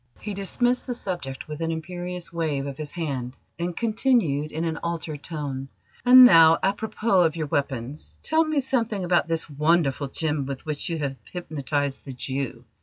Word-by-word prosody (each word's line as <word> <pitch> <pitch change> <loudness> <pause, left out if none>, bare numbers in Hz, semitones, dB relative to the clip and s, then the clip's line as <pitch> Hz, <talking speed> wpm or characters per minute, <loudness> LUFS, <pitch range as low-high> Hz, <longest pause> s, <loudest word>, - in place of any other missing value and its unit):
He 210 - -5
dismissed 245 +7 0
the 245 - -2
subject 175 - -5
with 155 +1 -6
an 165 - 0
imperious 175 +2 -5
wave 155 -5 -1
of 140 0 -6
his 150 -1 -5
hand, 135 -7 -4 0.2
and 175 0 -3
continued 215 - +1
in 160 +2 -2
an 165 -1 -2
altered 160 -3 -4
tone: 140 -4 -5 0.3
"And 255 +1 +10
now, 165 -6 +8
àpropos 205 -1 +2
of 160 - -5
your 160 -2 -2
weapons. 140 -1 -3
Tell 320 +1 +3
me 310 -2 0
something 230 -7 -1
about 175 0 +2
this 165 -1 0
wonderful 150 -2 +1
gem 150 0 -1
with 135 -1 -6
which 150 +1 -2
you 145 -5 -2 0.2
hypnotised 145 -5 -2
the 135 - -7
Jew." 130 -1 -4
160 Hz, 170 wpm, -25 LUFS, 140-185 Hz, 0.3 s, And